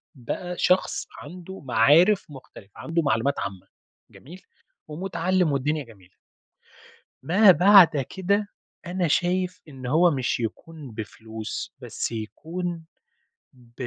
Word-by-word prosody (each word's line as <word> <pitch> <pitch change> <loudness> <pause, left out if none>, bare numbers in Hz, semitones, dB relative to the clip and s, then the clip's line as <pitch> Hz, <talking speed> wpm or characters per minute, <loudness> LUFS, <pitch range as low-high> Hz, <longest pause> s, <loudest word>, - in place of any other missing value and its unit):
بقى 175 +8 -5
شخص 185 +1 +1
عنده 180 +5 -10
معارف 150 - +4
مختلفة، 130 -7 -14
عنده 165 +1 -1
معلومات 140 0 0
عامة، 100 -2 -6 0.4
جميل، 175 +7 -14 0.5
ومتعلِّم 180 +1 -1
والدنيا 145 +2 -1
جميلة. 95 -5 -19 1.1
ما 190 +6 +6
بعد 180 -2 +7 0.2
كده، 200 +2 0 0.4
أنا 175 0 -1
شايف 180 +3 0
إن 130 -3 -11
هو 165 +6 +4
مش 130 -3 -1
يكون 140 +4 -6
بفلوس، 110 0 -7
بس - - -4
يكون 165 - -5 0.7
ب 120 -1 -22
155 Hz, 110 wpm, -24 LUFS, 120-180 Hz, 1.1 s, بعد